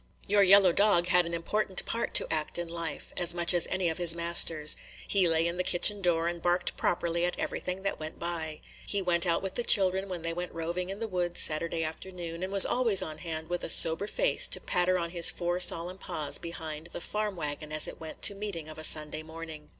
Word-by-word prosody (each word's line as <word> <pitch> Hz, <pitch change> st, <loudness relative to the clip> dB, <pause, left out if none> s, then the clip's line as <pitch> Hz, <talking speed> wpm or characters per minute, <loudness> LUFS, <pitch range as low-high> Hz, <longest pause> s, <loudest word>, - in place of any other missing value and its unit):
Your 205 Hz, 0 st, +2 dB
yellow 195 Hz, -1 st, +5 dB
dog 180 Hz, -2 st, +1 dB
had 175 Hz, -1 st, +2 dB
an 170 Hz, -, -6 dB
important 190 Hz, +3 st, -2 dB
part 230 Hz, -, -4 dB
to -, -, +3 dB
act 155 Hz, +1 st, -4 dB
in 175 Hz, 0 st, -5 dB
life, 165 Hz, -2 st, -7 dB
as 175 Hz, -1 st, +4 dB
much 175 Hz, 0 st, +3 dB
as 175 Hz, -2 st, +2 dB
any 185 Hz, -1 st, -2 dB
of 160 Hz, +1 st, -3 dB
his 170 Hz, -1 st, +4 dB
masters. 170 Hz, -2 st, +4 dB, 0.3 s
He 195 Hz, -3 st, +2 dB
lay 165 Hz, 0 st, +1 dB
in 170 Hz, +1 st, -3 dB
the 180 Hz, -, -1 dB
kitchen 200 Hz, +3 st, +4 dB
door 170 Hz, -2 st, 0 dB
and 170 Hz, 0 st, -5 dB
barked 175 Hz, +1 st, -1 dB
properly 170 Hz, 0 st, -2 dB
at 175 Hz, -, -2 dB
everything 185 Hz, +1 st, -5 dB
that 195 Hz, -, -4 dB
went 155 Hz, 0 st, -9 dB
by. 160 Hz, -3 st, -6 dB, 0.3 s
He 200 Hz, -, +1 dB
went 180 Hz, -2 st, +1 dB
out 170 Hz, -, -1 dB
with 190 Hz, -1 st, -5 dB
the 240 Hz, -, -3 dB
children 190 Hz, -2 st, +2 dB
when 175 Hz, -3 st, -6 dB
they 165 Hz, 0 st, -3 dB
went 175 Hz, 0 st, -7 dB
roving 170 Hz, +2 st, -5 dB
in 195 Hz, -, -6 dB
the 225 Hz, +1 st, -5 dB
woods 175 Hz, -3 st, -2 dB
Saturday 165 Hz, +1 st, +1 dB
afternoon, 170 Hz, +1 st, -8 dB
and 185 Hz, +1 st, -5 dB
was 195 Hz, -1 st, +6 dB
always 235 Hz, -6 st, +1 dB
on 155 Hz, -1 st, -9 dB
hand 160 Hz, -1 st, -7 dB
with 175 Hz, +1 st, -5 dB
a -, -, -5 dB
sober 165 Hz, +5 st, +7 dB
face -, -, +2 dB
to -, -, +1 dB
patter 180 Hz, +1 st, -1 dB
on 170 Hz, -1 st, -5 dB
his 170 Hz, -2 st, +3 dB
four 175 Hz, 0 st, -3 dB
solemn 180 Hz, +1 st, +1 dB
paws 155 Hz, -7 st, -1 dB
behind 160 Hz, -2 st, -8 dB
the -, -, -6 dB
farm 210 Hz, +2 st, -4 dB
wagon 150 Hz, -1 st, -6 dB
as 155 Hz, 0 st, +1 dB
it -, -, -10 dB
went 160 Hz, -1 st, -11 dB
to -, -, +6 dB
meeting 195 Hz, -6 st, -7 dB
of 155 Hz, 0 st, -11 dB
a -, -, -9 dB
Sunday 155 Hz, 0 st, +1 dB
morning. 160 Hz, -1 st, -11 dB
175 Hz, 230 wpm, -28 LUFS, 165-185 Hz, 0.3 s, sober